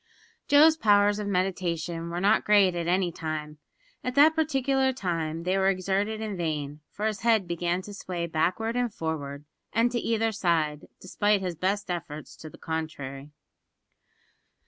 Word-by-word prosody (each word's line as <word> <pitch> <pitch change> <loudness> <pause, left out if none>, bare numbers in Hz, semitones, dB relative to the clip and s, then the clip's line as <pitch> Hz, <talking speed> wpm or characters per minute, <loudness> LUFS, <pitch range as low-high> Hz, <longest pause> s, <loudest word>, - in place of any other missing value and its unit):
Joe's 310 +2 +6
powers 205 -5 +4
of 210 - -3
meditation 175 -3 -2
were 170 +1 -3
not 205 +4 +3
great 200 -3 +4
at 170 -1 -3
any 180 0 +1
time. 155 -2 -5 0.4
At 250 0 -3
that 300 +3 +7
particular 270 -4 +1
time 165 -7 -3
they 185 +2 +1
were 190 0 +3
exerted 195 +3 -1
in 215 -2 -3
vain, 150 -4 -3
for 210 - -5
his 215 -2 -1
head 225 -5 +3
began 175 +1 -1
to 205 - -9
sway 180 -3 -4
backward 180 +8 -1
and 245 -2 0
forward 150 -5 -5 0.3
and 230 +2 +2
to 240 - -1
either 225 -1 0
side, 165 -7 0
despite 205 +2 +1
his 180 -2 -2
best 190 +3 -1
efforts 155 -3 -6
to 155 - -9
the - - -15
contrary. 145 -4 -5
185 Hz, 160 wpm, -27 LUFS, 165-215 Hz, 0.4 s, that